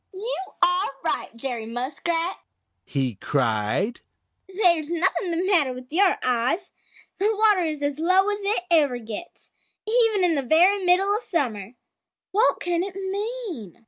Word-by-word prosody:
"You 425 Hz, +6 st, -2 dB, 0.3 s
are 360 Hz, +1 st, +3 dB
right, 325 Hz, -, -1 dB
Jerry 230 Hz, -2 st, -4 dB
Muskrat!" 315 Hz, +9 st, -2 dB, 0.5 s
he 135 Hz, -4 st, -2 dB
cried. 130 Hz, -, 0 dB, 0.5 s
"There's 345 Hz, -6 st, +2 dB
nothing 350 Hz, +1 st, 0 dB
the 340 Hz, +2 st, -1 dB
matter 325 Hz, -10 st, +2 dB
with 255 Hz, +3 st, -11 dB
your 380 Hz, +2 st, +3 dB
eyes. 255 Hz, +9 st, 0 dB, 0.5 s
The 405 Hz, +3 st, +2 dB
water 420 Hz, -3 st, +3 dB
is 305 Hz, -2 st, -3 dB
as 285 Hz, 0 st, -2 dB
low 370 Hz, +4 st, +3 dB
as 410 Hz, -, -3 dB
it 400 Hz, -2 st, 0 dB
ever 290 Hz, -7 st, +3 dB
gets, 225 Hz, +8 st, -9 dB, 0.3 s
even 445 Hz, -3 st, +3 dB
in 350 Hz, -2 st, +3 dB
the 285 Hz, -, 0 dB
very 355 Hz, +9 st, +4 dB
middle 380 Hz, +3 st, +3 dB
of 430 Hz, -, -2 dB
summer. 240 Hz, -, -3 dB, 0.6 s
What 435 Hz, +5 st, +2 dB
can 345 Hz, -1 st, -1 dB
it 380 Hz, 0 st, -5 dB
mean?" 390 Hz, -, -5 dB
345 Hz, 145 wpm, -24 LUFS, 255-390 Hz, 0.6 s, very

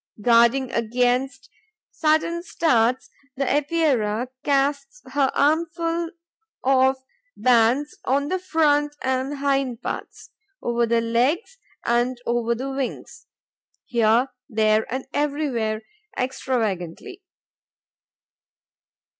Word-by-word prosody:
Guarding 235 Hz, +3 st, +4 dB
against 250 Hz, +3 st, 0 dB, 0.4 s
sudden 315 Hz, +2 st, +1 dB
starts, 255 Hz, -8 st, +1 dB, 0.2 s
the 275 Hz, 0 st, -1 dB
Epeira 270 Hz, -6 st, +1 dB
casts 280 Hz, -, 0 dB
her 275 Hz, -2 st, +2 dB
armfuls 330 Hz, +2 st, +1 dB, 0.5 s
of 265 Hz, 0 st, +3 dB, 0.4 s
bands 245 Hz, +4 st, +2 dB
on 280 Hz, +2 st, +1 dB
the 370 Hz, -, 0 dB
front 295 Hz, -4 st, +1 dB
and 260 Hz, +2 st, -1 dB
hind 275 Hz, -4 st, -1 dB
parts, -, -, -6 dB, 0.3 s
over 235 Hz, 0 st, 0 dB
the 230 Hz, 0 st, +2 dB
legs 260 Hz, -, 0 dB, 0.3 s
and 240 Hz, +2 st, +1 dB
over 235 Hz, 0 st, 0 dB
the 265 Hz, +3 st, -4 dB
wings, 270 Hz, -2 st, -5 dB, 0.6 s
here, 235 Hz, +2 st, +2 dB, 0.2 s
there 215 Hz, 0 st, +2 dB
and 260 Hz, +1 st, -3 dB
everywhere, 275 Hz, -7 st, -1 dB, 0.3 s
extravagantly. 250 Hz, -, -3 dB
260 Hz, 90 wpm, -23 LUFS, 235-290 Hz, 0.6 s, Guarding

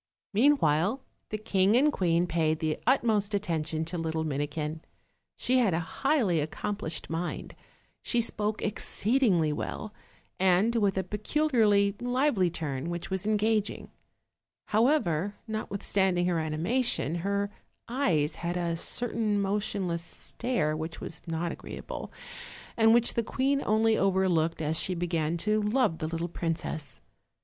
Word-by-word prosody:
Meanwhile, 215 Hz, -, +3 dB, 0.3 s
the 215 Hz, -, -2 dB
king 205 Hz, -1 st, +2 dB
and 295 Hz, +3 st, +4 dB
queen 170 Hz, -1 st, +2 dB
paid 160 Hz, -2 st, +1 dB
the 155 Hz, 0 st, -2 dB
utmost 220 Hz, -5 st, +2 dB
atten 175 Hz, -6 st, -1 dB
tion 160 Hz, +1 st, -2 dB
to 170 Hz, +2 st, -4 dB
the -, -, -2 dB
little 160 Hz, -1 st, -1 dB
Minikin; 150 Hz, +1 st, -3 dB, 0.6 s
she 255 Hz, +1 st, +2 dB
had 210 Hz, -9 st, +3 dB
a -, -, +1 dB, 0.2 s
highly 255 Hz, -, +3 dB
accomplished 160 Hz, +2 st, -4 dB
mind, 165 Hz, +2 st, -4 dB, 0.5 s
she 240 Hz, -, 0 dB
spoke 215 Hz, -2 st, -1 dB
exceedingly 210 Hz, -, +1 dB
well, 210 Hz, +7 st, -5 dB, 0.5 s
and 190 Hz, +5 st, +3 dB
with 200 Hz, -3 st, +2 dB
a 190 Hz, -, +1 dB
peculiarly 210 Hz, -, +2 dB
lively 245 Hz, -6 st, +2 dB
turn, 150 Hz, -2 st, -4 dB
which 175 Hz, +2 st, -5 dB
was 190 Hz, +1 st, -1 dB
engaging; 215 Hz, 0 st, 0 dB, 0.8 s
however, 205 Hz, -, +2 dB
notwithstand 200 Hz, -3 st, 0 dB
ing 175 Hz, -, +2 dB
her 175 Hz, -2 st, +1 dB
animation, 160 Hz, -, 0 dB
her 200 Hz, +3 st, -1 dB, 0.4 s
eyes 180 Hz, -, +1 dB
had 175 Hz, +1 st, -2 dB
a 170 Hz, -1 st, -1 dB
certain 220 Hz, +1 st, 0 dB
motionless 195 Hz, -3 st, -1 dB
stare 170 Hz, -2 st, -2 dB
which 160 Hz, +1 st, -5 dB
was 165 Hz, -, -5 dB
lot 165 Hz, +1 st, -2 dB
agreeable, -, -, -7 dB, 0.6 s
and 225 Hz, -1 st, +5 dB
which 235 Hz, 0 st, +3 dB
the 235 Hz, -, +1 dB
queen 275 Hz, +4 st, 0 dB
only 220 Hz, +1 st, +3 dB
overlooked 185 Hz, -5 st, +1 dB
as 155 Hz, +1 st, +1 dB
she 185 Hz, -, -1 dB
began 170 Hz, -2 st, -1 dB
to 215 Hz, +4 st, +1 dB
love 210 Hz, -5 st, +1 dB
the 155 Hz, -, -2 dB
little 165 Hz, +1 st, -2 dB
princess. 160 Hz, -5 st, -3 dB
190 Hz, 140 wpm, -29 LUFS, 165-220 Hz, 0.8 s, and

